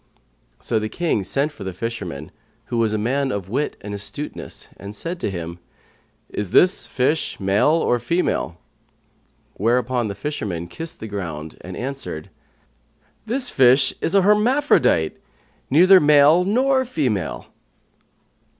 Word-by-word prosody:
'" - - -41
So 110 - +2
the 110 0 -3
King 160 - -1
sent 140 +9 0
for 110 - -10
the 95 -2 -5
fisherman, 90 -10 -5 0.4
who 120 - +1
was 115 -2 +2
a 110 - 0
man 135 +5 0
of 95 -4 -4
wit 140 +7 -2
and 105 0 -6
astuteness, 100 +9 -5
and 100 +1 -9
said 170 - -4
to - - -2
him, 85 -2 -6 0.7
"Is 105 -3 -4
this 180 - +4
fish 135 +5 0
male 100 +4 +2
or 150 -6 +2
female?" 120 - -1 1.0
whereupon 120 +2 0
the 100 - -5
fisherman 100 - -4
kissed 160 - -7
the 110 - -5
ground 85 -7 -6
and 90 0 -8
answered, 130 - -5 1.0
"This 250 +2 -1
fish 130 +1 +5
is 170 - 0
an 195 - +5
hermaphrodite,[FN#130] 210 - +3 0.5
neither 185 +7 +7
male 150 +3 +5
nor 260 +6 +2
female." 130 - -2
125 Hz, 140 wpm, -21 LUFS, 100-160 Hz, 1.0 s, neither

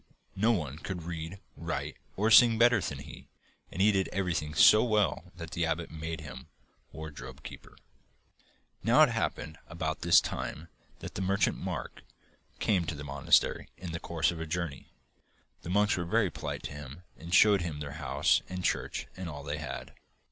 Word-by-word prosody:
No 110 +5 +3
one 75 - -2
could 90 -1 -5
read, 85 +2 -6 0.2
write, - - -4 0.2
or 110 +3 +2
sing 115 +1 +8
better 120 -2 +5
than - - -4
he, - - -11 0.4
and 95 - 0
he 105 - +6
did 95 -2 +1
everything 85 -5 -2
so 110 +7 +7
well 105 -5 0
that 85 -2 -8
the 85 - -1
abbot 80 0 -1
made 80 0 -5
him 65 -3 -9 0.4
wardrobe 70 -3 -9
keeper. - - -11 1.0
Now, - - +6
it - - +5
happened 80 0 -3
about 80 -1 -3
this 85 0 +7
time 80 +3 -5 0.3
that - - -7
the - - -4
merchant, 95 +1 +1
Mark, - - -5 0.6
came 95 -5 +1
to 80 - -3
the 75 - -7
monastery 70 -1 +2
in 90 -2 -7
the 85 - -4
course 85 -1 0
of 85 -1 -6
a 80 - -4
journey. 80 -3 -4 0.7
The - - -8
monks 105 +3 +3
were 85 - -2
very 105 +1 +2
polite - - -5
to - - -5
him 75 +3 -9
and 85 +1 -10
showed 100 +1 +6
him 80 -4 -4
their 75 -1 -5
house - - +2
and 90 0 -5
church - - -1
and 95 -2 -6
all 75 -2 -7
they 75 +1 -4
had. 75 - -6
85 Hz, 180 wpm, -30 LUFS, 75-95 Hz, 1.0 s, sing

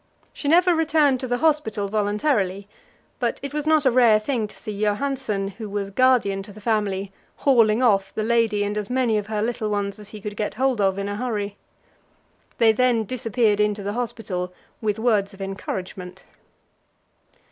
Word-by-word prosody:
She 285 - -5
never 350 +4 +5
returned 310 -4 +3
to 255 - -4
the 245 0 0
hospital 245 -10 +1
voluntarily, 205 -1 0 0.5
but 240 -3 -1
it 280 - -5
was 300 0 -2
not 310 -2 +3
a 260 - +5
rare 235 -3 +5
thing 225 -1 -1
to - - -14
see 215 - -6
Johansen, 215 -2 -1
who 215 -2 -5
was 200 -1 -3
guardian 235 -4 +3
to 205 +2 -10
the 210 - -12
family, 205 -3 -1 0.2
hauling 230 -3 +3
off 195 -5 +3
the 215 - -3
lady 225 -2 +2
and 205 +1 -2
as 205 - -6
many 245 -4 +1
of 205 - -7
her 215 -1 -1
little 225 -2 -2
ones 205 0 -2
as 210 -1 -11
he 215 - -9
could 210 0 -6
get 210 0 -3
hold 260 -2 +1
of 195 -1 +2
in 200 0 -3
a 205 0 -3
hurry. 210 -4 -3 1.0
They 225 -2 +5
then 235 0 +2
disappeared 225 -2 0
into 210 -1 +1
the 205 +1 -3
hospital 220 -7 -3 0.3
with 210 -1 0
words 215 -4 +1
of - - -19
encouragement. 190 -1 -6
215 Hz, 180 wpm, -23 LUFS, 205-250 Hz, 1.0 s, never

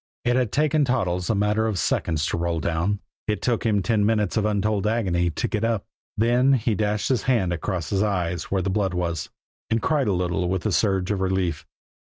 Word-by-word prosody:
It 120 0 +3
had 125 -4 +1
taken 150 0 +2
Toddles 90 -10 0
a 110 - +2
matter 105 +2 +1
of 105 -4 -1
seconds 75 -1 0
to - - -1
roll 85 -1 -1
down; 85 +6 -1 0.3
it 105 -1 0
took 120 -2 0
him 105 -3 +2
ten 105 +2 +2
minutes 105 -2 +1
of 110 -2 +1
untold 105 0 0
agony 95 -6 +1
to 80 - -2
get 105 0 -2
up. 115 -3 0 0.3
Then 120 +4 +3
he 115 -3 +1
dashed 105 0 0
his 125 -5 +2
hand 95 -9 +2
across 85 0 -3
his 95 -1 +1
eyes 90 -5 -1
where 95 -1 -1
the 95 - -1
blood 95 -2 0
was, 85 -4 -2 0.4
and 115 - +2
cried 145 0 +1
a 100 - +2
little 90 0 -1
with 95 -1 -1
the 110 - 0
surge 95 -1 +1
of 100 -2 -1
relief. 95 -4 -1
100 Hz, 210 wpm, -24 LUFS, 90-110 Hz, 0.4 s, It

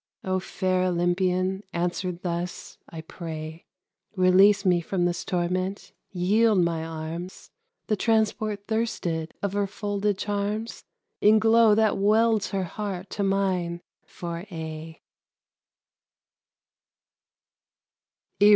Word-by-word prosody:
O 185 0 0
fair 185 0 0
Olympian, 185 +2 +1
answer 180 +2 -1
thus, 175 0 -5
I 165 -2 -7
pray! 160 -1 -8 0.5
Release 195 +2 +5
me 180 -2 +3
from 175 +1 -1
this 175 -1 -1
torment, 185 +2 -2 0.2
yield 205 +4 +3
my 170 -2 +1
arms 165 +3 -7 0.3
The 215 - +1
transport 215 -1 0
thirsted 180 -8 -2
of 200 -1 -1
her 205 0 0
folded 205 0 -2
charms, 205 +2 -3 0.4
In 215 +1 +6
glow 225 0 +5
that 215 -2 +2
welds 220 +1 +3
her 195 -1 -1
heart 190 0 -5
to - - -3
mine 185 -3 0 0.2
for 170 -1 -6
aye. 160 -1 -7
185 Hz, 105 wpm, -26 LUFS, 175-205 Hz, 0.5 s, In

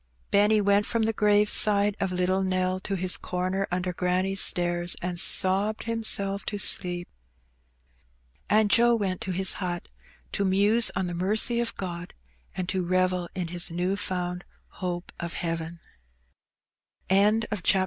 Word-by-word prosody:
Benny 210 +1 +4
went 200 +1 +2
from 230 -1 0
the 225 +1 0
grave 210 0 +2
side 205 -1 +2
of 190 -2 -1
little 185 +1 0
Nell 185 0 -1
to 195 +1 -4
his 185 -1 0
comer 185 +2 -3
under 180 0 -2
granny^s 185 +2 0
stairs, 175 -1 +2
and 175 -1 -2
sobbed 195 +4 +3
himself 205 -3 0
to 205 - -3
sleep. 175 -3 -2 1.4
And 215 -1 +3
Joe 235 0 +5
went 190 -5 -2
to 190 - -3
his 190 0 +2
hut 175 -2 -4 0.4
to 200 - -1
muse 205 +4 +3
on 185 +1 -1
the 175 - -4
mercy 210 +7 +2
of 235 -1 -1
Gx>d, 175 -2 -6 0.4
and 185 -1 -3
to 190 - -1
revel 180 0 0
in 180 -3 -3
his 175 0 +2
new 180 +3 -1
found 180 -2 -4 0.3
hope 175 -1 -5
of 170 0 -5
heaven. 165 0 -4 1.3
CHAPTER 210 +4 +3 0.2
XIII. 190 - +3
185 Hz, 150 wpm, -26 LUFS, 180-205 Hz, 1.4 s, Joe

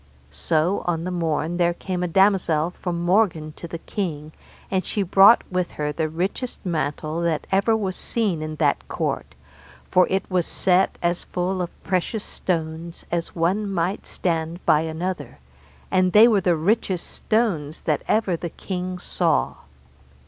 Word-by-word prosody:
So 160 - 0
on 165 -2 0
the 185 - -3
morn 165 -1 -1
there 175 -1 +2
came 180 0 -4
a 180 - 0
damosel 175 -3 +3
from 175 -1 -4
Morgan 175 -5 +2
to 170 - -8
the 170 - -5
king, 160 -5 -4 0.4
and 190 -1 +1
she 205 - -1
brought 195 +5 +7
with 180 -1 -1
her 150 0 -2
the 155 +1 -2
richest 190 +10 -3
mantle 155 -1 -2
that 165 -3 0
ever 200 +4 +3
was 190 -4 -2
seen 205 -9 -1
in 155 0 -4
that - - +1
court, - - -3 0.6
for 180 0 +5
it 190 +1 0
was 180 -3 0
set 190 0 +2
as 175 0 0
full 185 +1 -2
of 175 - -7
precious 190 +3 -1
stones 165 -1 -4
as 170 -1 -2
one 190 +5 +1
might 185 +2 -1
stand 165 0 -2
by 150 - +5
another, 165 +3 -4 0.5
and 185 -1 +3
there 225 +3 +8
were 205 -3 +3
the 175 -2 +2
richest 185 +1 0
stones 180 -10 -1
that 150 -3 0
ever 210 -5 +2
the 170 +1 -5
king 185 +1 -5
saw. 60 - 0
175 Hz, 160 wpm, -23 LUFS, 160-190 Hz, 0.6 s, there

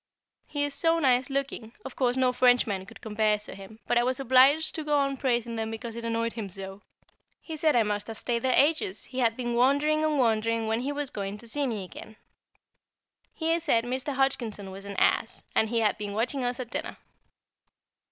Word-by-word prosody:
He 290 -1 -1
is 290 -1 -1
so 330 +2 +2
nice 255 -4 +2
looking, 270 -5 -3
of - - -7
course 250 -1 +1
no 255 -1 +2
Frenchman 245 -6 +2
could 225 - -14
compare 215 -1 +1
to 210 - -10
him, 200 +2 -12
but 240 - +2
I - - +2
was 255 +1 0
obliged 270 +4 +5
to 315 - -3
go 295 -1 +1
on 275 -1 +1
praising 240 -3 -1
them 220 0 -2
because 225 +1 -6
it 235 - -6
annoyed 230 0 -1
him 215 -4 -5
so. 195 +1 -8 0.6
He 320 - -7
said 310 -1 +2
I 235 - +5
must 205 -1 -2
have 225 -1 -7
stayed 235 0 -2
there 260 - +1
ages, 285 - +2
he 260 - -6
had 230 -2 +2
been 240 -1 -2
wondering 285 +5 +3
and 310 -1 +1
wondering 230 -2 +1
when 220 +1 0
he 275 +3 -2
was 290 -2 -3
to 205 +3 -5
see 280 +4 -1
me 215 -5 -3
again. 215 +4 -11 1.2
He 330 +1 0
said 280 -9 +2
Mr. 260 +4 -3
Hodgkinson 235 -7 -1
was 195 +1 -9
an 200 - -6
ass, - - +1
and 220 - +2
he 230 0 +1
had 215 0 +1
been 205 -1 -4
watching 250 +4 -1
us 245 +1 -2
at 245 -2 -6
dinner. - - -4
240 Hz, 210 wpm, -27 LUFS, 220-275 Hz, 1.2 s, obliged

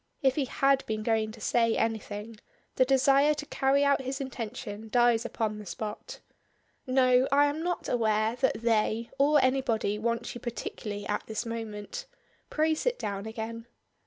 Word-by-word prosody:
If 265 -1 +4
he 280 -1 0
had 275 +1 +2
been 215 -1 -2
going 220 -1 +1
to 230 - -12
say 230 +1 +2
anything, 220 -1 -3 0.4
the 255 - +4
desire 275 +3 +4
to 295 - -6
carry 275 0 +2
out 280 -1 +3
his 265 +1 -4
intention 225 -4 -6
dies 240 0 +3
upon 215 -2 -2
the 210 - -9
spot. 215 - -6 0.7
"No, 255 0 +4
I 285 +1 +5
am 290 +2 -1
not 355 +1 -2
aware 220 -1 +1
that 255 -4 0
'they' 225 0 +1
or 295 +2 +5
anybody 235 -6 +1
wants 235 +1 -2
you 240 - -9
particularly 210 -3 -5
at 210 - -3
this 220 +2 -3
moment. 230 - -6 0.4
Pray 315 +1 +2
sit - - -1
down 200 - -4
again." 230 +1 -6
235 Hz, 160 wpm, -29 LUFS, 220-270 Hz, 0.7 s, I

